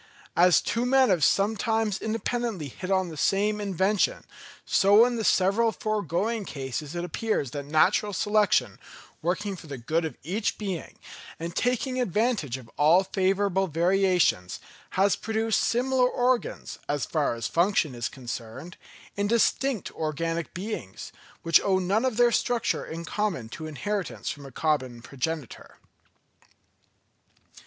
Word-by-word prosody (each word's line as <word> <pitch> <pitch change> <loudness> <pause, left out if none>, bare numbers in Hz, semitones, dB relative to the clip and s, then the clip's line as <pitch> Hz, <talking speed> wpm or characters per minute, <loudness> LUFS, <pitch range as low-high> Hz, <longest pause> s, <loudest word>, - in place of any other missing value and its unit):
As 175 -2 +5
two 230 +3 -1
men 260 0 +4
have 175 -5 +2
sometimes 220 +1 +1
independently 220 - -2
hit 185 +8 -7
on 190 -2 +1
the 160 - -9
same 210 +6 +1
invention, 195 +1 +1 0.4
so 205 +4 +5
in 245 -1 -1
the 225 - -2
several 205 +4 +3
foregoing 215 +1 -1
cases 140 0 -5
it 175 - -2
appears 180 - -2
that 145 0 -5
natural 185 +7 +3
selection, 210 0 +1 0.4
working 190 +4 -1
for 165 - -12
the 140 -2 -6
good 155 +8 -1
of 155 -6 -5
each 200 +8 -2
being, 195 -6 -5 0.4
and 170 +1 -5
taking 255 +1 0
advantage 210 - 0
of 125 -3 -13
all 165 +6 +5
favourable 195 0 +1
variations, 175 - +2 0.4
has 195 +1 +4
produced 220 0 0
similar 250 +1 +2
organs, 250 0 -1
as 145 -1 0
far 150 -6 0
as 115 -2 -5
function 170 - +1
is 120 -2 -3
concerned, 125 +5 -8 0.4
in 200 0 0
distinct 235 +1 +1
organic 165 +1 -3
beings, 180 - -6 0.3
which 165 -1 +5
owe 190 -1 +2
none 195 +6 +1
of 250 -4 -1
their 240 -1 +5
structure 240 0 0
in 165 +1 -7
common 180 - -2
to 155 +6 -7
inheritance 180 +6 -3
from 140 -2 -9
a - - -12
common 130 -5 -1
progenitor. 140 0 -5
190 Hz, 140 wpm, -26 LUFS, 155-215 Hz, 0.4 s, As